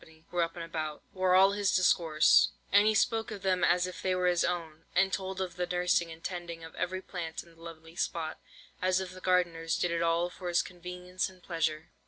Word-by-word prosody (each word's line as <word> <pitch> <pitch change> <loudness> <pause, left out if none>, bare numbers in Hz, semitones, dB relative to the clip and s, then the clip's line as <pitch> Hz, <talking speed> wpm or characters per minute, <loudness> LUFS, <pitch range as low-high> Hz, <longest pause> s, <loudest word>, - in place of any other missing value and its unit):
were 175 - +1
up 165 0 -1
and 170 -1 -5
about, 155 -2 -4
were 185 -1 +2
all 190 +1 +7
his 200 -1 +1
discourse; 165 -4 +4 0.2
and 205 +1 +6
he 215 - +3
spoke 225 0 +1
of 205 -3 -7
them 185 -2 +1
as 180 0 +4
if 185 -1 -7
they 185 -1 +1
were 180 0 0
his 175 -1 +3
own, 165 -3 -3
and 190 +1 +3
told 190 -1 -3
of 180 -2 -4
the 180 0 -1
nursing 180 -1 +1
and 160 0 -11
tending 170 -2 -5
of 160 - -10
every 185 +1 -3
plant 165 -3 -5
in 170 - -19
the 165 - -20
lovely 165 0 -11
spot, 165 -2 -2 0.4
as 185 0 +2
if 190 -1 -5
the 185 0 -11
gardeners 170 -3 +1
did 175 - 0
it 170 0 0
all 170 +1 +2
for 180 - -8
his 175 0 +2
convenience 180 +1 -5
and 185 -1 -19
pleasure. 160 -2 -2
180 Hz, 225 wpm, -30 LUFS, 165-185 Hz, 0.4 s, all